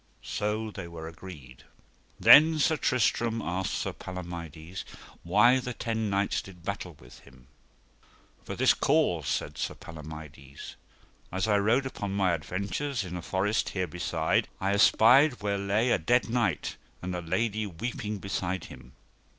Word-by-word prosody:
So 105 +1 -2
they 95 -4 -7
were 80 -1 -8
agreed. 80 -7 -11 0.6
Then 155 +2 +8
Sir 155 +1 +3
Tristram 120 -3 +1
asked 95 -2 -2
Sir - - -2
Palomides 85 -1 -7 0.4
why 105 +9 +4
the 125 -1 -5
ten 110 -2 -2
knights 100 0 0
did 90 -3 -14
battle 90 -3 -5
with - - -15
him. 65 -1 -19 1.0
For - - -6
this - - +4
cause, - - +1
said - - -2
Sir - - -2
Palomides; 75 -3 -10 0.6
as 95 +3 -1
I 105 -1 +3
rode 115 +7 +2
upon 105 -6 -4
mine 95 -3 +2
adventures 100 - -3
in 90 -1 -6
a 90 - -4
forest 95 +6 0
here 95 -2 -2
beside 85 -1 0
I 95 +1 0
espied 125 +8 +6
where 100 -1 0
lay 105 +5 +1
a - - +3
dead 120 +10 +2
knight, 115 -10 0 0.3
and 90 0 -3
a 90 - -3
lady 110 +5 -1
weeping 105 +3 -4
beside 95 -2 -3
him. 60 0 -13
95 Hz, 150 wpm, -28 LUFS, 85-110 Hz, 1.0 s, Then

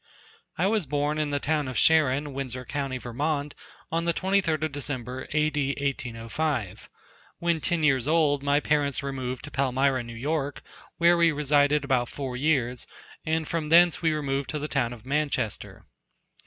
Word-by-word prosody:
I 175 - +1
was 205 -5 +1
born 145 +2 0
in 150 -1 0
the 145 0 0
town 150 -1 0
of 130 - -4
Sharon, 145 -2 +3
Windsor 130 -2 -5
co., 135 0 -3
Vermont, 145 +4 -2 0.4
on 165 +1 0
the 170 - +1
23d 185 -5 +1
of 155 - -1
December, 130 -3 -4
A.D. 150 -2 0
1805. 120 - -3 0.5
When 170 -2 0
ten 170 -2 0
years 135 -4 +3
old 150 -3 +3
my 140 +1 +2
parents 145 -2 0
removed 130 -2 -4
to 145 - -8
Palmyra, 135 0 +1
New 115 -1 -9
York, 145 +3 -2 0.3
where 170 +1 +5
we 170 -1 +5
resided 145 0 +2
about 130 -3 +1
four 135 -3 -5
years, 125 -3 0 0.4
and 160 0 0
from 160 -2 -2
thence 170 +1 +5
we 165 -1 +2
removed 140 -3 -2
to 155 - -2
the 150 0 -3
town 130 -6 0
of 120 -1 -10
Manchester. 135 -6 -2
145 Hz, 165 wpm, -26 LUFS, 130-155 Hz, 0.5 s, where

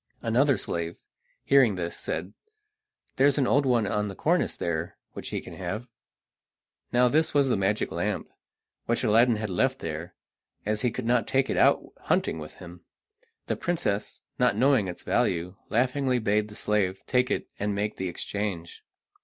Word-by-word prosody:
Another 130 +4 +3
slave, 85 0 -3 0.5
hearing 130 -7 +5
this, 85 -1 -3
said: 95 +3 -4 0.8
"There 135 - +6
is 145 - +2
an 140 - +3
old 140 +2 +3
one 120 -4 +3
on 105 +1 0
the 100 - -6
cornice - - +1
there 85 0 -3 0.2
which - - -6
he - - -2
can - - -10
have." 95 +7 -5 1.0
Now 125 +1 +4
this 155 +5 +1
was 140 -2 +4
the - - +3
magic 100 +2 0
lamp, - - -2 0.6
which - - 0
Aladdin 115 +2 +5
had 105 -2 -3
left 130 +9 +1
there, 80 0 -6 0.5
as 105 0 0
he 125 - +2
could 120 +1 -5
not 120 0 +2
take 135 0 +1
it - - 0
out - - +4 0.2
hunting - - 0
with 75 0 -8
him. 90 -1 -12 0.6
The - - -1
princess, 135 -12 -2 0.2
not 125 -4 +3
knowing 130 -4 +4
its 90 - -7
value, 90 +1 0 0.2
laughingly 125 +3 +1
bade 105 -2 +1
the 105 - -12
slave 95 -3 0
take 125 -1 +2
it - - -1
and 105 0 -1
make 105 +1 -2
the 95 -1 -2
exchange. 90 -1 -4
105 Hz, 170 wpm, -27 LUFS, 95-125 Hz, 1.0 s, There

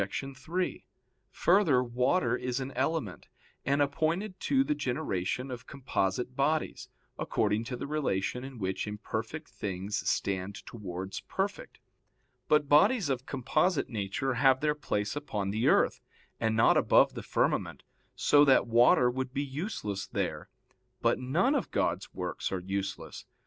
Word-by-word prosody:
3: 175 +8 -3 0.5
Further, 170 -9 +3
water 125 +9 +1
is 125 +1 -2
an 135 0 -4
element, 135 - -2 0.4
and 140 +2 +2
appointed 165 +8 -1
to 270 -1 +2
the 150 - 0
generation 130 - -2
of 125 0 -7
composite 125 -2 -2
bodies, 150 +3 0 0.3
according 105 0 0
to 125 +1 -4
the - - -5
relation 130 -6 -1
in 135 -1 -8
which 95 -1 -2
imperfect 110 +8 -5
things 95 +1 -3
stand 100 +1 -2
towards 95 -4 -6
perfect. 200 +1 -4 0.7
But 150 -1 +3
bodies 155 - +4
of 130 0 -2
composite 155 +5 +1
nature 110 +5 -2
have 130 +2 +4
their 150 +1 +1
place 105 -8 -2
upon 105 -9 -3
the 110 +3 0
earth, - - +3 0.4
and 110 -1 +1
not 115 - +5
above - - +4
the - - -6
firmament, - - -1 0.3
so 145 0 +5
that 135 -3 +5
water 120 +1 +5
would 130 +1 -2
be 140 - 0
useless 135 - -4
there. - - -3 0.5
But - - +3
none 165 - +2
of 285 - -1
God's - - -1
works - - -4
are 95 - -1
useless. 95 +1 -5
130 Hz, 140 wpm, -30 LUFS, 105-150 Hz, 0.7 s, not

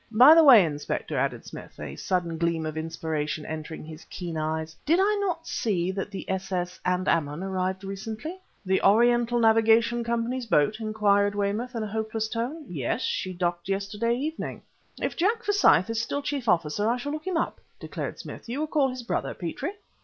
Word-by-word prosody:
"By 250 +7 +9
the 330 0 +7
way, 240 - +9
Inspector," 145 -2 -3
added - - -1
Smith, - - -10
a 75 -2 -6
sudden 170 - -2
gleam 170 -1 0
of 155 0 -4
inspiration 160 -1 -3
entering 160 0 -6
his 155 +1 -10
keen 175 -3 -6
eyes 160 0 -2
"did 330 +4 +3
I 410 +2 +3
not 345 -4 -2
see 185 -5 -1
that 195 +1 -4
the 195 -2 -7
s.s._Andaman_ 180 -3 -1
arrived 190 0 -2
recently?" 220 - -6 0.3
"The 190 0 +2
Oriental 240 +3 +4
Navigation 225 +1 +4
Company's 235 +1 -2
boat?" 175 +4 +2
inquired 205 -2 +2
Weymouth 210 +5 -2
in 225 - -2
a - - -3
hopeless 220 +1 -2
tone. 250 +8 -4
"Yes. 140 -8 -2
She 185 - -2
docked 175 0 -2
yesterday 205 +4 0
evening." 305 +6 -4 0.4
"If - - -2
Jack 440 +6 +1
Forsyth 400 - +4
is 225 0 0
still 285 +4 -3
chief 275 -5 -2
officer, 175 +4 +1
I 240 - +1
shall 285 +4 -4
look 310 +3 -5
him 365 -3 0
up," - - -2 0.2
declared - - -5
Smith. - - -9
"You 265 +5 -2
recall 300 -3 +1
his 255 -1 -6
brother, 235 - -2
Petrie?" 265 - -4
210 Hz, 175 wpm, -26 LUFS, 175-245 Hz, 0.4 s, By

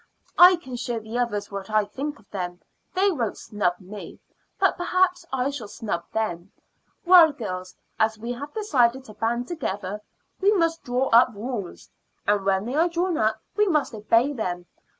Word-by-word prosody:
"I 360 +1 +10
can 260 -8 -8
show 235 -1 -3
the 220 +2 -5
others 210 -5 -2
what 200 0 -6
I 215 -1 +2
think 280 +8 -5
of 215 - -23
them. 180 -3 -4 0.4
They 390 +2 +3
won't 240 - -2
snub 200 -4 -1
me, 200 +2 -10 0.4
but - - +3
perhaps 360 -1 +1
I 265 +1 0
shall 255 -7 -6
snub 195 -5 -4
them. 195 -4 -3 0.5
Well, 345 -3 +8
girls, 185 -9 -6 0.2
as 220 0 +2
we 230 +3 -5
have 280 +4 -6
decided 265 - +1
to 215 - -11
band 235 +3 -1
together, 205 - -4 0.4
we 400 +2 +4
must 330 -4 +1
draw 250 +2 0
up 235 +2 +6
rules; 210 -3 -6 0.4
and 205 -1 +2
when 195 +1 +1
they 245 - -4
are 330 +4 +3
drawn 345 +1 0
up 220 0 0
we 420 0 +3
must 300 -8 +1
obey 230 +6 +2
them. 180 -8 -3
235 Hz, 175 wpm, -25 LUFS, 205-300 Hz, 0.5 s, I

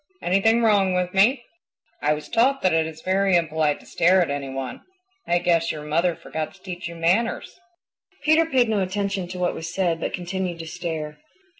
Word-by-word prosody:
Anything 225 +6 +3
wrong 200 -4 +3
with 180 0 -1
me? 235 +7 +3 0.6
I 150 +1 +2
was 150 - -8
taught 260 +4 +2
that 185 - +3
it 160 -1 +2
is 160 0 -10
very 190 0 +2
impolite 160 -3 +1
to - - -18
stare 185 +3 +3
at 170 -5 +1
any 140 -1 -3
one. 135 -1 -5 0.5
I 175 - +3
guess 170 -2 +1
your 150 -1 -7
mother 165 +3 +1
forgot 160 +1 -5
to 190 - -23
teach 180 -2 -6
you 170 - -8
manners." 185 - 0 0.6
Peter 315 +2 +4
paid 255 -6 +3
no 215 -2 +1
attention 195 0 -2
to 180 - -7
what 180 -1 0
was 165 +1 -6
said 175 -3 0
but - - -3
continued 180 -1 -3
to 165 - -7
stare. 160 -2 -5
180 Hz, 195 wpm, -23 LUFS, 165-195 Hz, 0.6 s, Peter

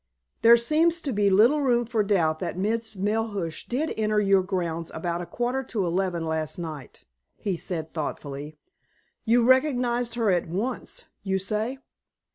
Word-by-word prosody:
"There 235 +1 +8
seems 320 +8 +2
to 275 -5 -2
be 205 -1 +3
little 230 +10 +5
room 240 -3 +2
for 230 -1 0
doubt 170 -7 +1
that - - -4
Miss 225 +3 -1
Melhuish 205 -4 -2
did 290 +6 -1
enter 215 -1 +2
your 195 -2 +4
grounds 170 -3 -3
about 170 +1 -2
a 175 - -6
quarter 245 +8 -1
to 205 -6 -1
eleven 175 -1 -1
last 160 -1 -2
night," 155 -5 -7 0.3
he 195 -3 -2
said 165 -2 -4
thoughtfully. 145 -1 -5 0.7
"You 235 +1 +4
recognized 245 -3 +2
her 225 -4 +2
at 175 -2 +1
once, 210 +10 -4 0.2
you 190 -1 0
say?" 215 +6 -2
205 Hz, 155 wpm, -26 LUFS, 170-235 Hz, 0.7 s, There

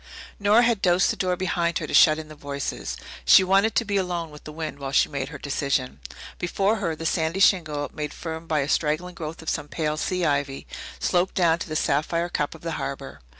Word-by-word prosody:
Nora 210 +4 +5
had 230 -4 +2
dosed 180 +1 +3
the - - -3
door 180 -1 0
behind 170 -2 0
her - - -3
to - - -7
shut 155 -1 +7
in 160 -1 -7
the 155 - -11
voices. 140 -2 -5 0.3
She 60 - +7
wanted 195 +4 +3
to 235 - +2
be 200 -1 0
alone 175 -4 -2
with 150 - -13
the 155 - -7
wind 155 -2 -5
while 135 -1 -4
she - - +3
made 140 -2 -3
her 150 - -8
decision. 135 - -2 0.4
Before 195 +5 +1
her 170 -6 -2
the 165 - -7
sandy 160 +2 0
shingle, 155 -7 +3
made 150 -1 -4
firm 160 0 -6
by 155 -2 +1
a 140 - -2
straggling 155 +4 0
growth 160 -1 -7
of 160 - -3
some 145 - -2
pale 155 -1 -2
sea 180 +3 -1
ivy, 140 -2 -1 0.3
sloped 180 +1 0
down 170 -2 +3
to - - -6
the 155 - -4
sapphire 165 +4 0
cup 150 -2 -2
of 160 - -14
the 165 - -4
harbour. 135 - -6
160 Hz, 225 wpm, -25 LUFS, 150-180 Hz, 0.4 s, shut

